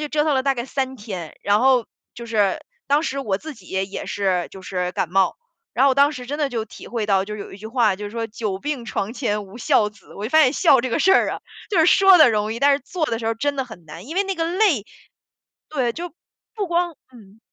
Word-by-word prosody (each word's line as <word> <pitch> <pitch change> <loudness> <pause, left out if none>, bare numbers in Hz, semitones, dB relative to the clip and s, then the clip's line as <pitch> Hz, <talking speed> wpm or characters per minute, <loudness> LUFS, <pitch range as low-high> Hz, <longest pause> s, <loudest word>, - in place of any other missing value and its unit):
就 295 - -4
折 295 0 +1
腾 300 -3 +2
了 260 - +1
大 275 0 +2
概 240 -1 -4
3 265 -1 -2
天。 190 -7 -7
然 205 +2 +3
后， 255 -3 +4 0.3
就 235 - -8
是， 210 -4 +1 0.3
当 290 +3 +3
时 275 -3 -3
我 210 -8 -1
自 315 0 -8
己 185 -7 -18
也 190 0 -1
也 200 - -6
是 185 -3 -1
就 190 - -11
是 180 -1 -3
感 175 - -2
冒。 190 0 +2 0.4
然 - - +3
后 - - +5
我 260 - +2
当 280 +1 +5
时 250 -4 -8
真 290 +3 -3
的 295 - +1
就 230 -4 -3
体 - - -12
会 230 -3 -2
到， 195 -2 +2
就 210 - -7
是 210 - -7
有 - - -8
一 - - -9
句 215 +2 -9
话 225 -4 +2
就 210 - -7
是 205 - -5
说 230 0 -3
久 210 -3 -4
病 285 -1 -4
床 215 -2 -3
前 210 -5 -2
无 195 +4 -13
孝 210 -2 +3
子， 205 -2 -19
我 205 - -6
就 230 - -3
发 315 - +6
现 255 - +4
孝 265 -2 +5
这 255 - -3
个 - - 0
事 385 +2 +5
儿 - - +3
啊， - - -5 0.3
就 385 - +1
是 320 - +5
说 385 -1 +7
得 310 - +8
容 215 0 0
易， 230 - -5
但 285 0 +5
是 280 - +1
做 320 +4 -3
的 230 -5 -2
时 225 - -6
候 225 - +2
儿 - - -5
真 285 +4 -1
的 265 - -1
很 220 -9 -13
难。 165 +6 -10
因 320 +6 -7
为 395 - +2
那 390 - -2
个 330 -2 -1
累 350 - +2 0.8
对， 255 -6 -1
就 345 +1 -6 0.4
不 415 -3 -2
光 345 -1 0 0.2
嗯。 215 -3 -17
235 Hz, 300 characters per minute, -22 LUFS, 205-290 Hz, 0.8 s, 得